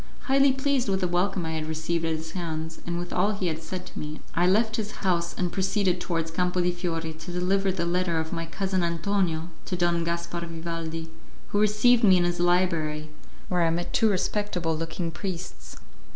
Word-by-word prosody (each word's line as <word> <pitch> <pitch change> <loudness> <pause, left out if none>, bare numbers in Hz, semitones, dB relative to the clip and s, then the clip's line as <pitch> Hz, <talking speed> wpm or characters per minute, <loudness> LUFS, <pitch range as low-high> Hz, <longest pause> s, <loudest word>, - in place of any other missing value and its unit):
Highly 275 0 +4
pleased 270 -3 +1
with 190 0 +1
the 180 - +2
welcome 180 +1 0
I 160 - -2
had 155 -1 -3
received 160 +1 -1
at 165 -1 +1
his 160 0 -6
hands, 160 -2 -4
and 170 0 -1
with 175 0 -4
all 200 +4 +2
he 195 -2 -3
had 160 -2 -1
said 180 +3 -5
to - - -8
me, 150 +1 -5
I 175 +1 +3
left 220 +4 +3
his 215 -2 -5
house 170 -2 +1
and 180 -2 0
proceeded 190 -2 +1
towards 165 -2 -1
Campo 180 +2 0
di 180 0 +3
Fiore 165 -2 -3
to 160 +3 -8
deliver 190 +2 +1
the 175 -2 -1
letter 175 -1 +1
of 160 +1 -3
my 165 -1 -3
cousin 190 +2 -1
Antonio 170 -1 0 0.2
to 185 - -2
Don 175 -1 +2
Gaspar 170 +1 -2
Vivaldi, 165 -1 -5 0.4
who 205 - +1
received 215 +3 +4
me 190 -4 +7
in 175 - +3
his 175 0 0
library, 165 -4 +1 0.4
where 180 -1 +1
I 165 - +4
met 175 +1 -2
two 225 - +4
respectable 185 -4 0
looking 165 +1 -3
priests. 185 0 -6
175 Hz, 200 wpm, -27 LUFS, 165-190 Hz, 0.4 s, me